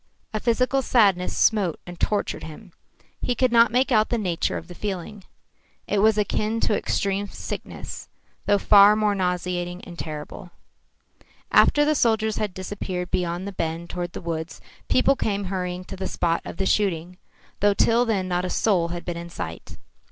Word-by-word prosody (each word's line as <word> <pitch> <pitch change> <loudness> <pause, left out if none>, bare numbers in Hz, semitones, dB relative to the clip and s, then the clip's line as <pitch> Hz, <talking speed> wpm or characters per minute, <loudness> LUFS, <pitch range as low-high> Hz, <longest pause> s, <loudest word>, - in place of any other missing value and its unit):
A 215 - -1
physical 255 +4 +1
sadness 200 -8 +2
smote 200 -7 +2
and 175 -1 -10
tortured 210 -1 -1
him. 175 +5 -10 0.5
He 245 - 0
could 255 -1 +2
not 230 0 +5
make 255 +3 +2
out 215 -2 +3
the 240 - 0
nature 180 -6 -1
of - - -8
the 180 - -9
feeling. 195 +1 -5 0.6
It 205 - 0
was 215 +1 +4
akin 215 +2 0
to 210 - +2
extreme 200 0 -1
sickness, - - -7 0.4
though 205 - +4
far 205 +1 +7
more 215 -1 +2
nauseating 180 -1 -2
and 175 -1 -11
terrible. 155 +4 -7 1.0
After 295 0 +5
the 305 - +3
soldiers 220 -5 +1
had 205 -4 -2
disappeared 185 -1 -5
beyond 175 +1 -1
the - - -4
bend 165 -1 -4
toward 175 -1 -4
the - - -6
woods, 165 -1 -4 0.3
people 275 +2 +4
came 205 -5 -1
hurrying 180 -1 -3
to 185 - -8
the 190 0 -4
spot 170 -2 0
of - - -7
the 195 - -1
shooting, 180 -3 0 0.4
though 205 0 +3
till 230 +4 +4
then 205 -6 0
not 180 0 0
a 185 - -2
soul 180 -4 +2
had 170 0 -6
been 175 -1 -4
in 170 0 -7
sight. 80 - -7
195 Hz, 175 wpm, -24 LUFS, 175-215 Hz, 1.0 s, far